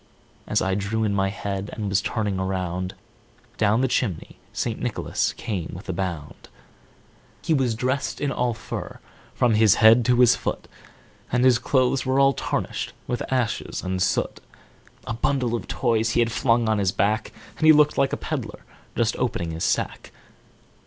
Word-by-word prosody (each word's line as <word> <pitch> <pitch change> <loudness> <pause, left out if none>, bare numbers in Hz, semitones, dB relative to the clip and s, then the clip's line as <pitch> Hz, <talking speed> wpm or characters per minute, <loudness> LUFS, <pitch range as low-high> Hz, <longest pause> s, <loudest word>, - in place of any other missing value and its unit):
As - - +1
I 95 - 0
drew 100 +3 -1
in 105 -2 0
my 95 -1 +1
head, 100 0 -4
and 105 -2 -4
was 100 +1 +1
turning 105 -4 -2
around, 90 -1 -3 0.6
Down 110 +3 +3
the 130 - +2
chimney 105 -9 -2
St. - - -3
Nicholas - - -1
came 95 -7 -4
with 90 - -10
a - - 0
bound. 85 -5 -5 1.0
e 160 - +3
was 130 -6 +1
dressed 130 +4 -2
all 135 -4 0
in 120 - 0
fur, 115 - -7 0.4
from 120 -2 +3
his 110 -2 +5
head 115 +2 +6
to 125 0 +3
his 125 0 +6
foot, - - -4 0.6
And 125 +1 +2
his 125 -2 +5
clothes 130 +1 +1
were 130 +1 +1
all 135 0 +5
tarnished - - -3
with 120 - -3
ashes 125 -3 -1
and 95 0 -2
soot; - - 0 0.7
A - - -3
bundle 125 0 0
of 120 - -3
Toys 115 -3 +1
he - - +2
had 115 -1 +2
flung 115 -1 +2
on 110 -1 +2
his 95 -2 +1
back, 105 +4 0 0.3
And 155 - +3
he - - +10
looked 150 -1 +5
like 135 - +2
a - - -1
peddler - - -5 0.3
just 115 -1 +1
opening 90 -9 -2
his 80 +1 0
pack. - - -6
110 Hz, 175 wpm, -24 LUFS, 95-125 Hz, 1.0 s, he